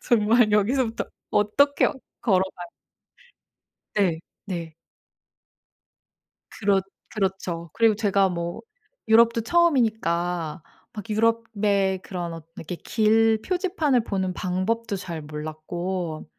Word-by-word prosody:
정말 225 -1 +3
여기서부터 225 +3 +1 0.3
어떻게 280 +8 +3 0.3
걸어가야 190 -4 0 1.3
네. 185 -6 +2 0.3
네. 170 -4 -5 1.8
그렇 200 -2 +1 0.3
그렇죠. 190 -5 -3
그리고 225 -1 +4
제가 200 -2 +2
뭐 170 -1 -4 0.5
유럽도 230 +1 +5
처음이니까 180 - +1 0.3
막 210 0 -8
유럽의 210 -3 +1
그런 175 -3 -5
엇 165 -1 -10
이렇게 170 +3 -6
길 220 +1 +2
표지판을 350 - +1
보는 190 -4 -1
방법도 200 +4 -1
잘 170 -4 -6
몰랐고 155 +3 -5
200 Hz, 215 characters per minute, -24 LUFS, 175-225 Hz, 1.8 s, 유럽도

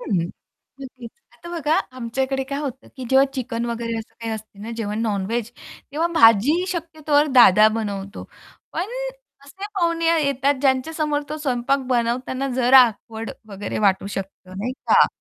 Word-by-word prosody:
हं, 175 -8 -1 0.5
नक्कीच. 250 -3 -10 0.2
आता 345 - -13
बघा 310 -1 +1 0.2
आमच्याकडे 265 +3 -2
काय 275 +1 -4
होतं, 275 -3 -6
की 260 - -6
जेव्हा 265 +1 +6
चिकन 240 -2 -3
वगैरे 230 -1 -3
असं 225 - -10
काही 230 -1 -4
असते 215 -2 -8
ना 225 - -6
जेव्हा 210 -2 -3
नॉन 210 -4 -1
व्हेज 230 +1 -2 0.4
तेव्हा 325 +3 +1
भाजी 230 - +5
शक्यतोवर 315 -4 0
दादा 215 -3 +8
बनवतो, 200 -2 -5 0.5
पण 345 - -1 0.6
असे 375 +8 -9
पाहुणे 335 -3 0 0.2
येतात, 280 +1 +1
ज्यांच्यासमोर 290 +2 0
तो 305 - -4
स्वयंपाक 270 -1 0
बनवताना 250 +2 -1
जरा 255 +1 +7
ऑकवर्ड 225 0 -7 0.2
वगैरे 200 0 -5
वाटू 195 0 +1
शकतं, 195 -2 -7
नाही 235 +6 -2
का. 265 - +4
250 Hz, 150 wpm, -22 LUFS, 225-280 Hz, 0.6 s, दादा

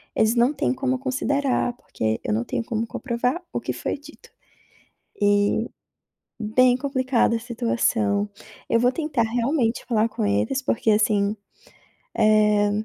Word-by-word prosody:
eles 220 +1 +3
não 240 +4 +3
têm - - 0
como 260 0 -1
considerar, 270 -1 0
porque 110 - -3
eu 105 - -1
não 115 +2 -1
tenho - - -2
como 230 0 -2
comprovar 250 +7 -2
o - - -1
que - - -3
foi - - -3
dito. 295 +2 -16 0.9
Eh, 205 +2 +2 0.7
bem 245 +3 +3
complicada 260 -3 +1
a - - -4
situação. 225 -3 0 0.4
Eu 230 - +3
vou 245 +1 +4
tentar 300 -5 -1
realmente 235 +1 0
falar 225 -2 +2
com - - -3
eles 105 - 0
porque 230 -3 0
assim, 210 -1 +2 0.8
eh, 210 -1 +4
230 Hz, 140 wpm, -23 LUFS, 215-255 Hz, 0.9 s, vou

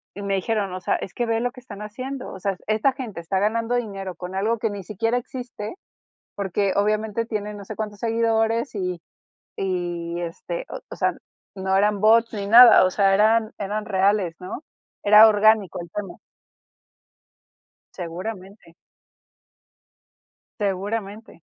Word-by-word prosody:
y 200 - -7
me 200 -1 -1
dijeron, 200 0 -1
o 185 - -4
sea, 180 - 0
es 195 - -5
que 240 - -1
ve 225 -1 0
lo 245 0 -1
que 255 - -13
están 245 -5 -10
haciendo, 255 +5 -6
o 190 - -9
sea, 195 0 -1
esta 220 +5 +2
gente 245 -9 -7
está 190 +3 -1
ganando 225 +4 0
dinero 195 -6 -4
con 180 +2 -7
algo 215 +3 0
que 225 - 0
ni 200 -2 -6
siquiera 225 +6 -1
existe, 245 -1 -6 0.6
porque 195 0 -1
obviamente 215 +2 0
tiene 210 -2 -4
no 205 -1 -9
sé 215 +2 -8
cuántos 210 -2 -5
seguidores 230 +1 +1
y 180 -3 -3 0.6
y, 175 -2 -3
este, - - -5 0.3
o - - -5
sea, - - +1 0.4
no 190 0 -1
eran 205 0 +2
bots 225 +1 +4
ni 200 -1 -4
nada, 235 0 +9
o - - +2
sea, 195 -1 +3
eran 215 +2 +3
eran 210 +1 -3
reales, 195 -3 +1
¿no? 190 - -7 0.4
Era 210 +2 +9
orgánico 215 -3 +3
el 170 - -10
tema. 195 -2 -5 1.8
Seguramente. 185 +1 -7 1.9
Seguramente. 205 +1 -3
210 Hz, 150 wpm, -23 LUFS, 190-225 Hz, 1.9 s, nada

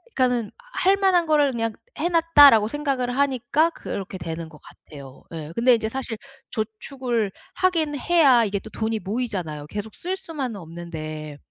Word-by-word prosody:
그러니까는 245 -4 +1 0.2
'할 385 +2 +3
만한 375 -3 +3
거를 295 -3 +4
그냥 230 -2 -2 0.3
해 345 - +1
놨다.'라고 290 -10 +7
생각을 260 -3 -2
하니까 280 +3 +2
그렇게 195 - -6
되는 165 -1 -6
것 150 - -15
같아요 140 -3 -13
예. 160 -1 -6
근데 245 +2 +5
이제 220 -1 0
사실 245 -3 -4 0.3
저축을 225 0 -2 0.2
하긴 330 -6 +1
해야 275 -7 +5
이게 200 -1 -1
또 220 - -11
돈이 220 0 -2
모이잖아요. 185 -10 -4
계속 210 +3 -6
쓸 370 +2 -3
수만은 280 - -5
없는데. 155 -3 -7
235 Hz, 340 characters per minute, -24 LUFS, 195-290 Hz, 0.3 s, 놨다.'라고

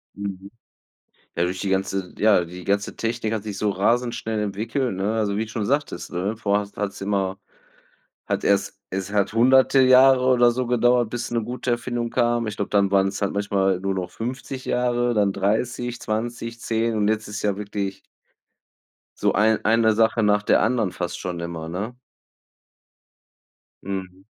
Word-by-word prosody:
Mhm. 100 -1 -6 0.8
Ja, 85 - +1
durch 90 +1 -2
die 100 - -2
ganze 95 -1 -1
ja, 105 -4 +4
die 90 +2 -10
ganze 100 0 0
Technik 115 -1 -2
hat 110 -2 -3
sich 105 -2 -5
so 105 +1 0
rasend 120 +5 +1
schnell 110 -1 -3
entwickelt, 110 +5 -2
ne? 100 +3 -1
Also, 105 -2 0
wie 110 - -1
du 110 - -11
schon 110 -3 -2
sagtest, 140 -5 -2
ne? 95 +5 -2
Vorher 105 -1 +1
hast 100 0 -11
hat's 100 -2 -4
immer 100 -1 -1 0.9
hat - - -2
erst 100 0 +1
es 95 +1 -4
hat 100 0 +1
hunderte 130 +3 +5
Jahre 130 0 +6
oder 125 -2 +5
so 125 +1 -2
gedauert, 120 -1 +3
bis 120 - -3
'ne 115 -1 0
gute 125 +2 -3
Erfindung 120 0 -2
kam. 120 -1 +1
Ich 105 - -4
glaube, 100 -1 -3
dann 100 -1 +3
waren's 95 0 +1
halt 100 - 0
manchmal 100 -2 +1
nur 95 0 -1
noch 95 -2 -3
50 130 +2 -6
Jahre, 120 0 +1
dann 105 -3 +2
30, 120 +5 -1
20, 115 +1 -4
10, 115 0 0
und 105 -1 +1
jetzt 110 0 0
ist 105 0 -5
ja 100 -2 +1
wirklich 100 -1 -4 1.2
so - - +2
ein 110 +2 +2
eine 110 0 +4
Sache 115 +1 +2
nach 105 0 +3
der - - +3
anderen 110 -4 +1
fast 90 -1 -4
schon 90 -2 -4
immer, 85 -1 -5
ne? 100 +8 -4 1.9
Mhm. 95 -1 -6
105 Hz, 175 wpm, -23 LUFS, 100-120 Hz, 1.9 s, Jahre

